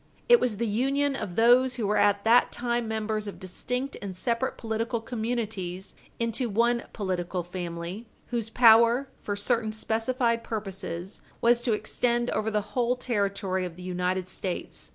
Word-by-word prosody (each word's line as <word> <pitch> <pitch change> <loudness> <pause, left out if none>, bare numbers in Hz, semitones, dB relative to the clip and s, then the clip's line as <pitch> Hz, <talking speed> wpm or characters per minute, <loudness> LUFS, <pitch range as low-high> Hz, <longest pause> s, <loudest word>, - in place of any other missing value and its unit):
It 480 -1 +8
was 230 -5 0
the 235 - 0
union 270 +6 +1
of 180 -9 -5
those 245 +3 +5
who 235 -4 -2
were 210 +1 +1
at 205 0 +3
that 235 +2 +5
time 240 -1 -1
members 215 -1 -2
of 200 - -7
distinct 250 +8 -3
and 195 -2 -5
separate 235 +6 -1
political 230 +1 -2
communities 220 -6 -4 0.3
into 230 +1 -1
one 235 +3 +2
political 180 -3 -2
family, 175 +4 -6 0.2
whose 230 -2 -2
power, 235 +3 +6
for 205 - -3
certain 220 +2 0
specified 230 +2 0
purposes, 195 -4 -5 0.2
was 240 0 +4
to 240 -2 +1
extend 240 +3 0
over 215 +1 0
the 210 -1 -2
whole 245 0 +2
territory 200 -6 -1
of 175 -2 -5
the 180 - -10
United 180 0 -1
States. 185 0 -5
220 Hz, 155 wpm, -27 LUFS, 195-240 Hz, 0.3 s, It